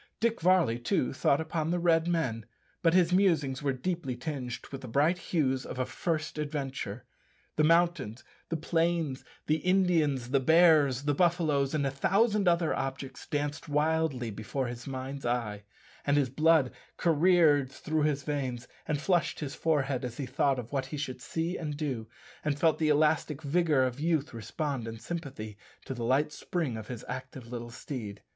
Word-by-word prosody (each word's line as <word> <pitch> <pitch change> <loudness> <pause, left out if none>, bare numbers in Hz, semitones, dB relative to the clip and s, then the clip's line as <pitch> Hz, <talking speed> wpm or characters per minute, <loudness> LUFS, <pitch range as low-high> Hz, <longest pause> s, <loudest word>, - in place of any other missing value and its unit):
Dick 230 -2 0
Varley, 175 -9 +3
too, 120 +2 0
thought 140 +2 +2
upon 160 0 -2
the 175 - +1
Red 170 -1 +3
men, 125 -10 -1 0.3
but 165 0 +3
his 180 -1 +4
musings 160 -9 +2
were 140 -1 +1
deeply 135 0 -3
tinged 125 -1 -5
with 135 -1 -6
the 130 - -8
bright 150 +9 +2
hues 135 -8 0
of - - -7
a 130 - 0
first 155 0 -3
adventure. 135 -6 -4 0.5
The 155 - +3
mountains, 165 -8 +2 0.3
the 165 - -1
plains, 165 -3 0 0.2
the 155 - +2
Indians, 160 -8 +2
the 140 - +4
bears, 150 -3 +5
the 145 0 +1
buffaloes, 155 -4 +2
and 145 -2 +1
a 135 - 0
thousand 200 - +2
other 170 -2 +3
objects, 135 0 -5
danced 145 +1 -3
wildly 150 -5 +1
before 110 +6 -3
his 120 +1 -6
mind's 135 +1 -5
eye, 115 -4 -2 0.4
and 145 0 +2
his 135 -4 +1
blood 155 -2 +4 0.3
careered 160 -4 +4
through 155 +3 -2
his 145 -2 +1
veins 130 -4 -3 0.2
and 150 -2 0
flushed 175 0 +1
his 145 -3 -4
forehead 140 -6 0
as 125 -1 -5
he 140 - -3
thought 135 +2 +1
of 120 -2 -6
what 135 -2 -1
he 150 - -5
should 130 -3 -4
see 165 +6 -2
and 150 -3 -4
do, 130 -8 -3 0.4
and 150 -2 0
felt 160 -1 +3
the 155 -1 +2
elastic 150 0 +2
vigour 150 -2 +2
of 130 +1 -2
youth 155 -3 0
respond 125 +2 -3
in 115 0 -6
sympathy 115 -8 -6 0.3
to - - -4
the 120 -2 -5
light 135 +6 +2
spring 155 -6 -3
of 110 -1 -7
his 120 -3 -7
active 130 0 -6
little 120 -1 -5
steed. 115 -4 -7
145 Hz, 175 wpm, -30 LUFS, 130-165 Hz, 0.5 s, bears